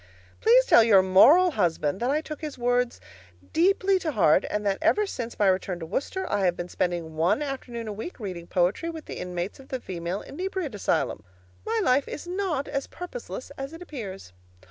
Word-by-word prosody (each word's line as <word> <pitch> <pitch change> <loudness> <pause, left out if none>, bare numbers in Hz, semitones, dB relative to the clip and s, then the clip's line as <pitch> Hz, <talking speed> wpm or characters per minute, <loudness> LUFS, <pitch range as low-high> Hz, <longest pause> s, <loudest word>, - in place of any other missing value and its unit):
Please - - +5
tell 230 - +7
your 200 -4 +6
moral 300 - +6
husband 170 - 0
that 245 - 0
I 300 +3 +1
took 305 -2 -8
his 300 -3 -6
words 245 0 0 0.5
deeply 380 +2 +3
to 315 -4 -3
heart, 185 -4 +4
and 210 0 -2
that 195 -1 +1
ever 420 0 +3
since 240 - -6
my 205 - +2
return 185 -1 +1
to 165 - -6
Worcester 280 - -3
I 200 - 0
have 175 -1 +1
been 175 0 -5
spending 170 -4 -2
one 170 - +2
afternoon 245 -5 -5
a 210 - -4
week 225 - -7
reading 180 -5 -6
poetry 185 - +1
with 320 -2 -7
the - - -7
inmates 180 +4 -4
of 270 - -14
the 260 - -4
Female 180 -2 -4
Inebriate 365 - -4
Asylum. 190 - -1 0.4
My 450 +1 +1
life 270 -2 +3
is 300 - -6
not 355 -6 -2
so 275 - +1
purposeless 360 +8 -7
as 270 +3 -5
it 330 - -10
appears. 200 - -8
240 Hz, 195 wpm, -26 LUFS, -, 0.5 s, tell